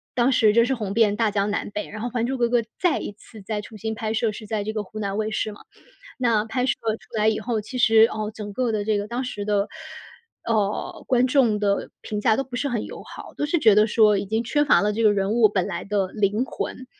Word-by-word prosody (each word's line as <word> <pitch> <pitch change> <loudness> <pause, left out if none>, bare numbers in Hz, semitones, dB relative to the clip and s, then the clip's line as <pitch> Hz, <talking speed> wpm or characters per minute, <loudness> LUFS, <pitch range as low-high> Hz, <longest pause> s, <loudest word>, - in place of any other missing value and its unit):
当 250 +1 +3
时 220 -4 +4
真 235 +1 +5
是 265 - 0
红 210 -6 -3
遍 210 -2 +3
大 225 0 +1
江 200 0 0
南 205 - -2
北。 210 +1 -5
然 215 0 -7
后 245 - -2
《还 235 -1 -1
珠 265 +2 -2
格 240 -1 +1
格》 240 0 +3 0.2
再 355 -4 +2
一 - - -5
次 215 +1 -15
再 210 +1 -3
重 215 +1 -11
新 220 +2 -3
拍 220 0 -3
摄 225 0 +1
是 215 +1 -9
在 210 -1 -2
这 215 +1 -4
个 215 -1 -2
湖 215 +2 -9
南 200 -1 -2
卫 215 0 -1
视 215 - -2
嘛， 205 - -13 0.6
那 230 -4 +2
拍 250 +3 -1
摄 - - +2 0.3
出 - - -20
来 215 0 +3
以 220 - +1
后， 235 -3 -2
其 250 +5 -7
实， 225 -2 +6
哦， 215 -1 -3
整 205 -1 -7
个 245 +1 -1
的 210 -1 -1
这 215 -1 +1
个 205 - -3
当 240 +3 -2
时 210 -5 -5
的， 205 -1 0 0.8
呃， 215 -3 -1
观 250 -1 +3
众 255 -5 +3
的 200 -1 0
评 210 -1 -4
价 220 +1 +3
都 270 - -1
不 255 -2 -7
是 280 - -1
很 235 -5 -2
友 - - -9
好， - - -11
都 295 - -1
是 340 +4 +1
觉 220 -8 +5
得 210 +1 +5
说 215 -2 +4
已 200 - -3
经 220 +3 0
缺 295 +5 +1
乏 290 - +5
了 210 +1 +1
这 225 +2 -1
个 215 -2 +5
人 195 0 0
物 225 -1 +5
本 195 -3 -1
来 175 -4 -4
的 200 -2 0
灵 210 +3 +1
魂。 255 -1 -6
215 Hz, 290 characters per minute, -23 LUFS, 210-240 Hz, 0.8 s, 实